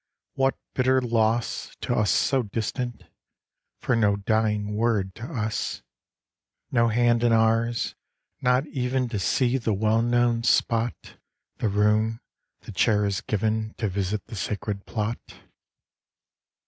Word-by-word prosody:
What 135 0 +1 0.2
bitter 130 0 +3
loss 115 -1 0
To - - -1
us 105 -1 +2
so 135 -1 +2
distant. 120 +3 -4 0.8
For 125 - +1
No 105 -3 +3
dying 105 0 0
word 105 -4 0
to 115 - -8
us; 110 -8 -3 0.9
No 115 -2 +3
hand 120 +1 +2
in 120 - +4
ours; 115 +1 +2 0.5
not 125 +3 +2
even 130 -2 -1
To 105 - -2
see 125 +7 +1
the 110 -3 0
well 110 +2 +2
known 120 0 +2
spot, 115 0 0 0.4
The 110 - 0
room, 105 +2 +2 0.4
the - - -10
chair 105 +1 +2
is 100 -2 -1
given; 110 +1 -1
To 110 - -1
visit 100 +1 -2
the - - -9
sacred 100 0 -4
plot. 110 +1 -2
115 Hz, 130 wpm, -25 LUFS, 105-120 Hz, 0.9 s, in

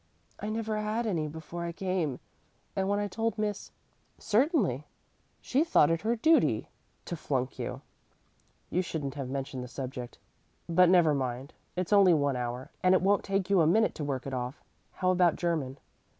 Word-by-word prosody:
"I 210 - -4
never 220 0 -2
had 215 +2 -1
any 165 -8 0
before 160 +3 -7
I 170 - -3
came, 175 -7 -2 0.6
and 190 0 0
when 205 - +2
I 205 0 0
told 225 +3 -2
Miss 210 -1 -2 0.3
" - - -40 0.2
"Certainly; 215 - +2 0.5
she 275 +4 +2
thought 165 - +4
it 165 - 0
her 230 +2 +1
duty 320 +8 +3 0.4
to 175 - -4
flunk 135 -4 -2
you. - - -4 0.9
You 180 - +2
shouldn't 150 -6 -4
have 140 -3 -5
mentioned 135 -1 -4
the - - -7
subject. 125 -1 -6 0.5
But 175 +1 +5
never 175 -4 +5
mind. 130 0 -3 0.2
It's 180 +2 -1
only 195 -4 +7
one 140 -3 +1
hour, 125 +1 -4
and 185 0 +5
it 185 - +2
won't 200 +1 +3
take 195 -1 -1
you 190 -3 +5
a 155 - +4
minute 220 +7 +3
to 150 - -5
work 135 -3 -3
it 135 - -5
off. 125 +2 -4 0.3
How 185 0 +1
about 180 -2 +3
German?" 155 -6 -2
170 Hz, 180 wpm, -29 LUFS, 140-205 Hz, 0.9 s, only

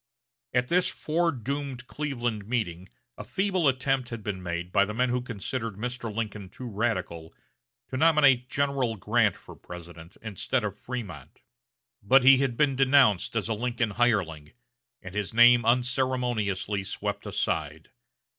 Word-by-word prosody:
At 125 0 0
this 180 +1 +3
fore 165 +2 0
doomed 135 0 -5
Cleveland 120 -8 -3
meeting 95 -7 -3 0.3
a - - -5
feeble 190 -5 0
attempt 130 -1 +1
had 115 -3 -7
been 100 -3 -4
made 85 0 -4
by 100 - +4
the 105 +1 -4
men 125 +2 +1
who 125 0 0
considered 115 -1 -4
Mr. 120 +1 -4
Lincoln 105 -3 -5
too 125 +6 -9
radical, 95 -7 -3 0.5
to 130 - -4
nominate 140 -5 +4
General 140 -5 0
Grant 95 - +2
for - - -13
President, 85 0 -11
instead 110 +3 -2
of 105 -2 -5
Frémont; 90 - -7 0.6
but 130 +6 +5
he 135 +1 +8
had 130 -4 -1
been 145 -3 +2
denounced 130 -6 +4
as 110 -3 -1
a 115 - 0
Lincoln 115 0 -1
hireling, 95 -10 0 0.5
and 90 -1 -9
his 105 +1 -3
name 120 +1 +7
unceremoniously 120 -5 0
swept 95 - -4
aside. 80 +1 -3
120 Hz, 145 wpm, -27 LUFS, 100-130 Hz, 0.6 s, he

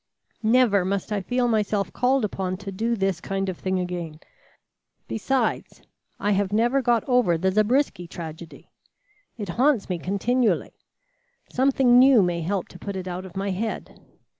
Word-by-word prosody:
Never 225 -4 +4
must 195 +2 -2
I 205 -1 0
feel 245 +6 0
myself 210 -3 0
called 255 -1 +2
upon 185 -2 -3
to 200 0 -7
do 225 +5 -1
this 195 -4 -1
kind 195 0 -2
of 180 - -5
thing 185 0 -1
again. 175 -3 -5 0.9
Besides, 235 +1 -2 0.4
I 205 - 0
have 200 -1 +1
never 240 +6 +2
got 240 -1 +1
over 245 -10 +3
the 190 +3 +1
Zabriskie 215 -2 +1
tragedy. 165 -1 -9 0.7
It 205 -4 -5
haunts 250 +3 +1
me 180 -2 -2
continually. 220 +7 0 0.8
Something 255 -1 +4
new 255 -5 +6
may 175 -1 -1
help 185 +2 -2
to 180 - -13
put 200 -1 -5
it 185 -1 -5
out 185 +1 -5
of 190 - -11
my 195 0 -1
head. 220 +4 -4
200 Hz, 160 wpm, -24 LUFS, 185-240 Hz, 0.9 s, new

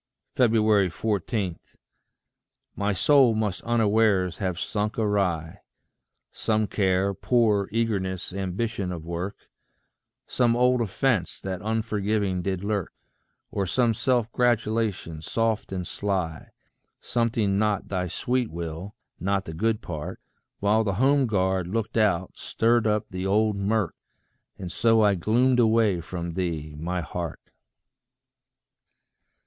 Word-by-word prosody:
14. 105 -4 +1 1.2
My 100 +1 0
soul 125 +4 +4
must 105 -4 -1
unawares 110 -5 +2
have 90 -3 -2
sunk 105 +1 -2
awry. 95 -7 0 0.7
Some 110 -1 0
care, 95 -1 +1
poor 105 -1 +2
eagerness, 95 -6 -1
ambition 95 +1 -2
of 85 -3 -6
work, 85 +3 -5 0.8
Some 120 -2 +2
old 125 0 +3
offence 110 -3 0
that 95 -2 -4
unforgiving 105 -3 0
did 95 0 -2
lurk, 100 -3 -2 0.6
Or 100 -1 -1
some 120 +4 +2
self 120 0 0
gratulation, 110 -8 0
soft 115 +4 -1
and 90 -2 -3
sly 95 -6 -3 0.5
Something 115 -4 0
not 105 -2 0
thy 90 -2 -1
sweet 125 +6 -1
will, 85 +4 -6 0.2
not 100 +2 0
the 80 - -6
good 110 +6 0
part, 75 -4 -6 0.4
While 105 +2 +3
the 100 -3 -1
home 135 +4 +3
guard 95 -3 0
looked 110 +3 -3
out, 95 -5 +1
stirred 115 0 +1
up 105 -1 +1
the 95 +1 -3
old 105 +1 +2
murk, 100 -1 0 0.6
And 90 -3 -6
so 115 +1 +3
I 105 -1 +5
gloomed 120 +8 +2
away 110 -6 +3
from 85 0 -5
thee, 80 -4 -3
my 90 +2 -2
Heart. 85 0 -6
100 Hz, 120 wpm, -26 LUFS, 90-115 Hz, 1.2 s, I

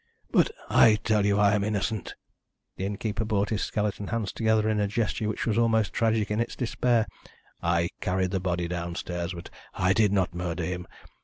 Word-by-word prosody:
"But - - +4 0.2
I 110 -2 +6
tell 105 -2 +2
you 100 0 +2
I 105 0 +4
am 105 -1 +1
innocent." 105 0 -2 0.6
The 95 - -3
innkeeper 105 +2 -2
brought 105 -1 0
his 110 - 0
skeleton 105 -1 -2
hands 110 -3 -2
together 110 -1 +2
in 110 -1 +1
a 105 - +2
gesture 110 0 -1
which 110 - -3
was 115 0 +1
almost 110 -2 +2
tragic 110 -2 +1
in 105 - 0
its 115 - -2
despair. 120 -1 +1 0.6
"I 85 0 +1
carried 95 0 0
the 95 - 0
body 90 -1 -1
downstairs, 85 0 -4
but 85 - -9 0.2
I 95 0 +3
did 105 -1 +3
not 95 -3 +1
murder 90 0 -3
him. 90 +1 -4
105 Hz, 185 wpm, -27 LUFS, 90-110 Hz, 0.6 s, I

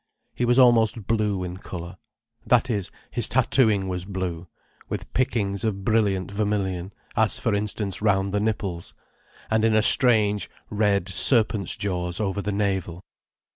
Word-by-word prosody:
He 125 - -1
was 120 +1 +2
almost 115 -4 +4
blue 105 -4 -1
in 90 0 -6
colour—that 115 +7 -4
is, 100 -4 -2 0.2
his 120 -3 +2
tattooing 115 -6 +2
was 90 -1 -4
blue, 95 -3 -5 0.4
with - - -6
pickings 105 -6 0
of 100 -3 -3
brilliant 100 -4 0
vermilion: 100 -3 -2 0.2
as 110 -2 +2
for 115 - -1
instance 100 -2 -3
round 100 -2 +1
the 105 - +1
nipples, 100 -5 -3 0.6
and 110 0 +2
in 110 -1 +3
a 110 - +3
strange 110 -6 +4 0.2
red 100 -3 +1
serpent's 105 +1 +3
jaws 90 -3 -3
over 100 -1 -2
the 105 - -3
navel. 95 -3 -2
100 Hz, 140 wpm, -24 LUFS, 95-110 Hz, 0.6 s, almost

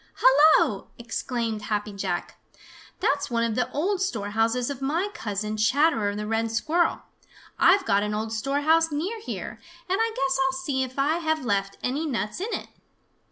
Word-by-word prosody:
"Hello!" 270 -7 +5
exclaimed 235 -2 -3
Happy 210 0 -2
Jack. 200 - -4 0.6
"That's 285 +1 +1
one 230 -1 0
of 230 -1 0
the 250 - -1
old 370 +6 0
storehouses 225 - 0
of 275 -1 -7
my 330 +9 0
cousin, 215 - -3
Chatterer 225 -2 +2
the 210 0 -4
Red 225 +1 0
Squirrel! 320 +10 +1 0.6
I've 395 -1 +5
got 200 0 +3
an 210 0 -2
old 220 +1 -3
storehouse 290 +7 +2
near 360 +10 -2
here, - - -6 0.3
and 380 +2 0
I 455 0 +1
guess 270 +2 0
I'll 355 0 0
see 290 -7 -1
if 260 0 -4
I 290 +4 +2
have 315 -4 -1
left 200 -2 -1
any 285 +6 -1
nuts 235 +1 -3
in 435 +4 -3
it." - - -4
265 Hz, 165 wpm, -25 LUFS, 220-315 Hz, 0.6 s, Hello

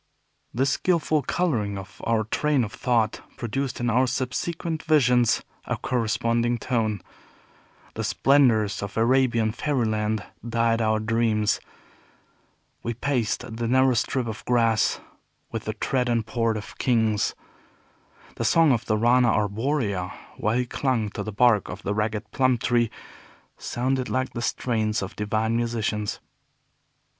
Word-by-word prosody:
This 135 +3 +1
skillful 155 -3 +1
coloring 120 - -1
of 95 -1 -10
our 115 -1 +2
train 140 +5 +1
of 105 - -5
thought 115 -4 0 0.2
produced 130 +3 -3
in 120 - -1
our 125 +3 +3
subsequent 155 +6 -2
visions 125 -7 +3 0.2
a - - -2
corresponding 115 0 0
tone. 110 -4 -1 0.9
The - - -4
splendors 120 -7 +3
of 100 +1 -6
Arabian 120 -2 +3
fairyland 110 -5 -1 0.2
dyed 115 0 +1
our 110 -1 +2
dreams. 110 -1 +1 1.2
We 120 0 -3
paced 120 -3 -2
the 120 0 -1
narrow 130 +1 +4
strip 125 +2 0
of 110 -2 -6
grass 115 -3 +2 0.5
with 115 -1 -4
the 110 - -2
tread 125 +3 -1
and 115 -2 +1
port 115 0 0
of 105 - -9
kings. 110 -4 +1 1.0
The - - -2
song 165 -3 +4
of 120 -2 0
the 110 - +1
Rana 120 +2 +4
arborea, 105 -3 -1 0.3
while 110 +3 0
he 125 - +1
clung 120 -4 -1
to 105 - -5
the 110 +1 -4
bark 105 -1 +3
of 95 - -7
the 105 - -1
ragged 110 +1 -2
plum 130 -2 +2
tree, 120 0 +1 0.7
sounded 130 +1 -2
like 130 0 -1
the 120 - -4
strains 110 -4 -1
of 95 - -7
divine 110 +2 0
musicians. 110 -3 -1
115 Hz, 135 wpm, -25 LUFS, 110-130 Hz, 1.2 s, narrow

